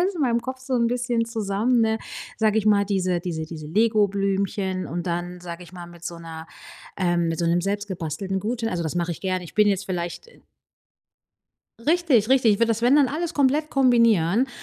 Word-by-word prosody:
alles 380 +2 +1
in 330 - -5
meinem 235 -3 +2
Kopf 260 +1 -6
so 260 0 -3
'n 235 -1 +2
bisschen 240 -1 0
zusammen, 225 +2 0
ne, 220 0 +2 0.4
sage 220 -1 +2
ich 215 - -2
mal, 205 -1 +4
diese 185 -3 0
diese 165 -3 -4
diese 155 -1 -8
Legoblümchen 195 -1 0
und 175 +1 -4
dann, 175 +1 -3
sage 175 0 -8
ich 175 - -16
mal, 175 -1 -9
mit 170 -1 -14
so 170 - -5
'ner 165 -1 -9 0.5
ähm, 175 -2 +1
mit 165 -1 -2
so 170 - 0
'nem 170 +1 +2
selbstgebastelten 195 -2 -3
Gutschein. 225 +2 -2
Also, 175 -1 -2
das 160 -3 -3
mache 175 0 -1
ich - - -9
gerne. 185 -2 -2
Ich - - -12
bin 210 0 +4
jetzt 200 -1 0
vielleicht, 175 - -4
äh - - -21 1.5
Richtig, 300 - +3
richtig. 255 -5 +5
Ich - - -6
würde 230 - +2
das, 225 0 0
wenn 245 +4 +4
dann 290 -2 +5
alles 325 +6 -3
komplett 290 +2 +2
kombinieren, 230 - +3
200 Hz, 205 wpm, -24 LUFS, 175-240 Hz, 1.5 s, richtig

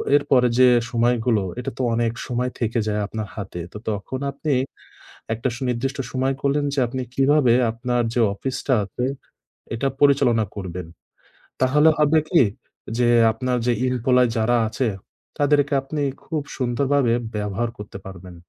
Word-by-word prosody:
এর 145 - +3
পরে 125 -2 +5
যে 130 - +8 0.2
সময়গুলো, 120 -3 +2 0.2
এটা 125 - -4
তো - - -2
অনেক 115 -1 +1 0.2
সময় 125 0 -1
থেকে 115 0 0
যায় 105 0 0
আপনার 110 0 -5
হাতে। 95 -4 -6
তো - - -6
তখন 110 +5 -4
আপনি 145 +2 -2 0.8
একটা 115 +4 -2
সুনির্দিষ্ট 130 +2 -2
সময় 130 +1 0
করলেন 140 +1 +1
যে - - -5
আপনি 130 +2 -4
কীভাবে 135 -2 +4 0.2
আপনার 120 +1 -1
যে 120 - +2
অফিসটা 130 +4 -1
আছে, 110 +5 -4 0.7
এটা 135 +4 -1
পরিচালনা 125 -6 +4
করবেন। 90 -3 -6 0.7
তাহলে 150 +4 +5
হবে 150 +1 +4
কি 170 -7 +5 0.6
যে 120 - +3 0.2
আপনার 125 +3 -1
যে 120 - +4
employee 125 0 +3
যারা 120 +2 +2
আছে, 120 +2 -1 0.5
তাদেরকে 145 0 +2
আপনি 145 +2 -4 0.2
খুব 155 -2 -3 0.2
সুন্দরভাবে 130 0 +1 0.2
ব্যবহার 105 +3 -2
করতে 105 -1 -8
পারবেন। 90 -1 -10
125 Hz, 145 wpm, -22 LUFS, 115-135 Hz, 0.8 s, যে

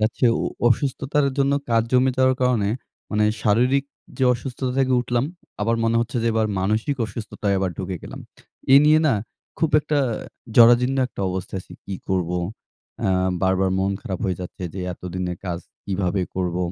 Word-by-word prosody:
যাচ্ছে 110 +4 0 0.4
অসুস্থতার 140 +3 +1
জন্য 140 0 +3 0.2
কাজ 115 -1 +4
জমে 130 +1 +4
যাওয়ার 130 0 +4
কারণে 120 -5 +2 0.4
মানে 105 0 +2 0.2
শারীরিক 125 +6 +3 0.3
যে 130 - +2
অসুস্থতা 125 +1 -4
থেকে 130 -1 +2
উঠলাম 120 0 0 0.4
আবার 115 +3 +1
মনে 115 0 +2
হচ্ছে 120 +2 -3
যে - - 0
এবার 110 -1 +2
মানসিক 110 +9 0
অসুস্থতায় 105 -1 -3
এবার 95 -1 0
ঢুকে 95 -1 -3
গেলাম। - - -8 0.5
এ - - +10
নিয়ে 155 +1 +6
না 140 - +4 0.4
খুব 160 0 +1
একটা 150 0 0 0.6
জরাজীর্ণ 120 +3 +6
একটা 125 - -9
অবস্থায় 95 +1 -4
আছি, - - -16
কী 100 - -5
করব, 90 -3 0 0.7
অ্যা 95 - +1 0.3
বারবার 95 0 +2
মন 95 +1 +1
খারাপ 95 -7 -4
হয়ে 95 -2 -1
যাচ্ছে 90 +1 -8
যে 95 - -4
এতদিনের 90 0 -5
কাজ 85 -2 -2 0.3
কীভাবে 95 -1 -1
করব? 90 -2 -1
110 Hz, 160 wpm, -23 LUFS, 95-130 Hz, 0.7 s, এ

